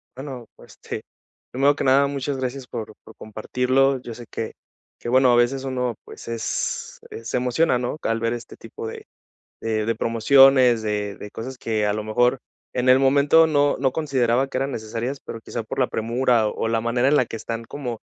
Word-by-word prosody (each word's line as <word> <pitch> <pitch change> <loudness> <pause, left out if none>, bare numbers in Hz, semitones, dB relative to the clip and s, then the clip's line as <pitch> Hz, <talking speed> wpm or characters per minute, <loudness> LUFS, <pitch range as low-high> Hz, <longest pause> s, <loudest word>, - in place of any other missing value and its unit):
Bueno, 130 -3 -7
pue - - -17
este, - - -7 0.5
primero 140 +3 +3
que - - -3
nada, 135 +1 +5
muchas 140 0 -3
gracias 130 0 -4
por 115 -2 -6
por - - -15
compartirlo. 125 +5 0
Yo 120 - -7
sé 120 +1 -10
que 110 - -5 0.5
que 120 - -5
bueno, 130 0 +5
a - - +5
veces 125 +3 +2
uno, 125 -3 -2
pues, - - -12
es 115 -1 -3 0.2
se 115 - -2
emociona, 125 +3 +2
¿no?, 125 +4 -3
al 115 0 0
ver 115 +1 0
este 120 -1 -8
tipo 115 0 -8
de - - -8 0.6
de 110 -1 -1
de 115 -1 0
promociones, 125 +1 +5
de 105 -2 -2
de 105 - -9
cosas 130 +3 -7
que 110 -2 -1
a 105 - +1
lo 110 - -3
mejor 125 +4 +2 0.3
en 125 0 +1
el 130 - +8
momento 140 +4 +5
no 145 -2 +2
no 135 0 +1
consideraba 130 -4 +1
que 130 - -4
eran 135 +1 -1
necesarias, 115 +4 -4
pero 115 - -7
quizá 115 - -5
por 110 - -7
la 125 - +3
premura, 115 0 +1
o 115 - -3
la 115 0 +1
manera 120 +2 +1
en 150 - +4
la 130 - +3
que - - -6
están 115 +1 -5
como 125 -4 -5
125 Hz, 200 wpm, -23 LUFS, 115-135 Hz, 0.6 s, el